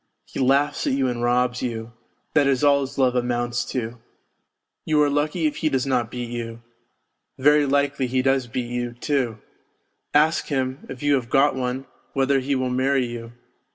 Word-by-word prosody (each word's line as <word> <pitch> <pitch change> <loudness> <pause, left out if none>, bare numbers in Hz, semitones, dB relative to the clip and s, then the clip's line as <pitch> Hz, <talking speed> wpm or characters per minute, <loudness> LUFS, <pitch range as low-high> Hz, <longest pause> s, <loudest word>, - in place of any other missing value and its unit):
He - - -7
laughs 135 +2 +2
at - - +2
you 135 -1 +1
and 120 -1 -2
robs 125 +1 +1
you 115 -2 -4 0.4
that 145 -3 +4
is 135 0 +1
all 140 -1 +5
his 135 +1 -5
love 130 -2 +3
amounts 120 0 0
to! 120 -1 -4 0.8
You 155 -1 +1
.are 145 -1 +4
lucky 150 +3 0
if 150 - 0
he 155 - +1
does 130 -2 0
not 125 -4 0
beat 120 -1 -5
you. 115 -1 -6 0.7
Very 145 +2 +4
likely 140 -1 +1
he 130 +1 0
does 135 -1 +2
beat 120 +1 -4
you, 120 -1 -2
too. 125 -3 -1 0.7
Ask 155 +2 +3
him, 130 -1 -2
if 135 +1 -8
you 145 0 +3
have 125 -4 0
got 140 +1 +4
one, 130 +1 -3 0.3
whether 135 0 +2
he 135 +2 -1
will 130 -1 -1
marry 130 +1 +2
you. 120 -1 -7
130 Hz, 185 wpm, -23 LUFS, 120-140 Hz, 0.8 s, all